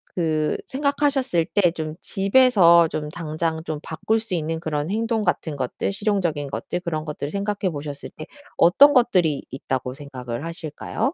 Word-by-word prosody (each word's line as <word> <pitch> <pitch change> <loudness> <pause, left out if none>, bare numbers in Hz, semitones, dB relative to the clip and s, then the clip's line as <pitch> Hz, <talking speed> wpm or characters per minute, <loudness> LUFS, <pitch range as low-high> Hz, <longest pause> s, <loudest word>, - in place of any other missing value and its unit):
그 155 -3 0
생각하셨을 280 - +1
때 180 -5 +4
좀 155 -2 -5
집에서 195 -5 +5
좀 150 -1 -4
당장 160 0 -3
좀 155 -2 -4
바꿀 215 +9 -1
수 220 -5 -4
있는 160 0 -2
그런 155 +1 -2
행동 225 0 0
같은 170 -5 -1
것들, 130 +7 -2
실용적인 180 -9 -1
것들, 175 - -4
그런 160 -4 -3
것들을 150 -2 -5
생각해 200 -2 -1
보셨을 145 -1 -7
때 155 - -8 0.3
어떤 280 +12 +6
것들이 180 - +3
있다고 130 -1 -4
생각을 130 -2 -6
하실까요? 165 - -3
165 Hz, 330 characters per minute, -23 LUFS, 150-205 Hz, 0.3 s, 어떤